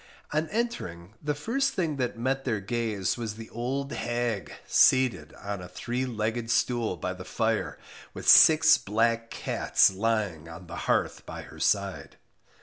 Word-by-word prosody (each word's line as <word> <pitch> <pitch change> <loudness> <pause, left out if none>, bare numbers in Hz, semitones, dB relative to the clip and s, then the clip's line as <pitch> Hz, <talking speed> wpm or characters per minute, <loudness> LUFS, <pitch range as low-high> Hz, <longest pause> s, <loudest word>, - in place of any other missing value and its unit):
On 155 +1 0
entering, 105 - -4
the 150 0 -1
first 270 - -1
thing 160 -6 -1
that 125 -3 -2
met 135 +3 -1
their 115 -5 -1
gaze 110 -1 -2
was 110 -2 -4
the 110 0 -10
old 135 +4 -3
hag, 120 -7 -2
seated 115 - +3
on 100 -2 -6
a 90 - -8
three 125 +7 -3
legged 115 0 -2
stool 120 -6 0
by 90 +3 -3
the 90 0 -9
fire, 110 +4 -1 0.3
with - - -8
six 160 0 +8
black 115 +2 0
cats - - +2
lying 100 -6 -1
on 85 +3 -10
the 85 0 -8
hearth - - +1
by - - -7
her - - -13
side. - - -1
115 Hz, 155 wpm, -27 LUFS, 100-130 Hz, 0.3 s, six